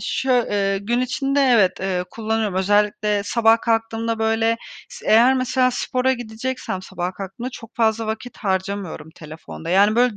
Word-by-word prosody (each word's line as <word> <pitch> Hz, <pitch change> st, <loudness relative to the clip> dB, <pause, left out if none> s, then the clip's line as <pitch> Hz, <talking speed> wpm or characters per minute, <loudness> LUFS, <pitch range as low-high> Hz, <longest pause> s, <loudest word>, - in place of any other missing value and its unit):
şö 255 Hz, -2 st, +1 dB
eee, 195 Hz, -1 st, +1 dB
gün 235 Hz, +5 st, -1 dB
içinde 270 Hz, +3 st, 0 dB
evet, 235 Hz, -9 st, +4 dB
eee, 185 Hz, -1 st, -1 dB
kullanıyorum. 220 Hz, -2 st, -2 dB
Özellikle 205 Hz, +2 st, +1 dB
sabah 225 Hz, +1 st, +3 dB
kalktığımda, 225 Hz, 0 st, -1 dB
böyle, 225 Hz, +1 st, +1 dB, 0.3 s
s -, -, -11 dB
eğer 235 Hz, +4 st, +6 dB
mesela 255 Hz, 0 st, +2 dB
spora 255 Hz, +1 st, 0 dB
gideceksem 235 Hz, -4 st, -4 dB
sabah 185 Hz, -1 st, -4 dB
kalktığımda 200 Hz, +7 st, -6 dB
çok 230 Hz, -3 st, -12 dB
fazla 225 Hz, -1 st, +1 dB
vakit 220 Hz, +3 st, -5 dB
harcamıyorum 190 Hz, -5 st, -3 dB
telefonda. 160 Hz, +1 st, -9 dB
Yani, 200 Hz, +4 st, +4 dB
böyle, 245 Hz, -3 st, +3 dB
225 Hz, 150 wpm, -21 LUFS, 195-240 Hz, 0.3 s, eğer